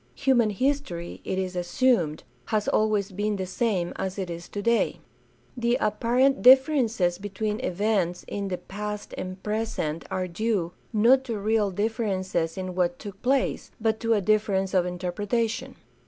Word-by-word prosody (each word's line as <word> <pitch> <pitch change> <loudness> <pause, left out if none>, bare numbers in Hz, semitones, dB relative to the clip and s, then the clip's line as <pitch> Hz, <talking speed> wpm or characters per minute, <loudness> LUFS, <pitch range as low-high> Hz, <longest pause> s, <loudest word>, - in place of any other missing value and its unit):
Human 255 -5 +3
history, 210 -7 -2
it 190 - -2
is 185 -1 -2
assumed, 175 - +1 0.2
has 215 -1 0
always 210 -2 +1
been 205 +2 -1
the 190 -1 -3
same 190 -2 -1
as 190 0 -3
it 185 -3 -3
is 170 0 -7
today. 230 +3 +1 0.6
The 240 -1 +1
apparent 245 +5 +2
differences 250 - +5
between 210 +2 -3
events 190 -5 0
in 200 -1 -3
the 185 -2 -2
past 210 +2 -6
and 185 +1 -6
present 210 -7 -2
are 185 -1 -2
due, 180 -1 -1 0.2
not 240 +4 +5
to 230 -4 -3
real 210 0 +1
differences 190 -5 -1
in 185 -1 -4
what 175 -1 0
took 200 -2 -9
place, 265 +1 0
but 220 0 +1
to 230 -1 +2
a 205 - +1
difference 200 -2 +1
of 180 -2 +3
interpretation. 205 +6 -2
205 Hz, 150 wpm, -26 LUFS, 185-230 Hz, 0.6 s, differences